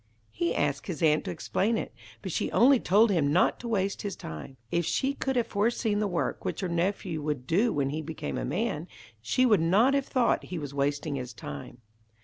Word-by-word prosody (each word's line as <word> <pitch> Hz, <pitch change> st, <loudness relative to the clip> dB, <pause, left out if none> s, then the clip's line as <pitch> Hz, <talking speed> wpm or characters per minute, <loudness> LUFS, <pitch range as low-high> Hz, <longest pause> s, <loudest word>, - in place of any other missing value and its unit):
He 170 Hz, +9 st, -1 dB
asked 140 Hz, -1 st, -1 dB
his 170 Hz, -4 st, -4 dB
aunt 155 Hz, +2 st, +3 dB
to -, -, -3 dB
explain 200 Hz, +6 st, 0 dB
it, -, -, -4 dB, 0.3 s
but -, -, -4 dB
she -, -, -1 dB
only 260 Hz, +2 st, +6 dB
told 210 Hz, +3 st, +4 dB
him 150 Hz, -6 st, +2 dB
not 175 Hz, -, +3 dB
to 240 Hz, -, -6 dB
waste 200 Hz, -3 st, 0 dB
his 200 Hz, -3 st, -4 dB
time. 80 Hz, -, -8 dB
If 170 Hz, -, +1 dB
she 265 Hz, -, 0 dB
could 265 Hz, -1 st, -2 dB
have 240 Hz, -2 st, +2 dB
foreseen 215 Hz, 0 st, 0 dB
the 210 Hz, -, +1 dB
work 175 Hz, -3 st, -2 dB
which -, -, -3 dB
her 185 Hz, -, -1 dB
nephew 170 Hz, -1 st, -1 dB
would 145 Hz, -4 st, -3 dB
do 205 Hz, -, +2 dB
when 140 Hz, -1 st, 0 dB
he 155 Hz, +2 st, -3 dB
became 160 Hz, +1 st, -5 dB
a -, -, -3 dB
man, 180 Hz, -5 st, -2 dB, 0.3 s
she 255 Hz, -, +2 dB
would 210 Hz, -8 st, +4 dB
not 205 Hz, +11 st, +4 dB
have 275 Hz, -1 st, +1 dB
thought 250 Hz, -3 st, +1 dB
he 180 Hz, -, -5 dB
was 145 Hz, -3 st, -5 dB
wasting 145 Hz, +1 st, -1 dB
his 125 Hz, -2 st, -6 dB
time. 75 Hz, -, -8 dB
175 Hz, 215 wpm, -28 LUFS, 145-220 Hz, 0.3 s, only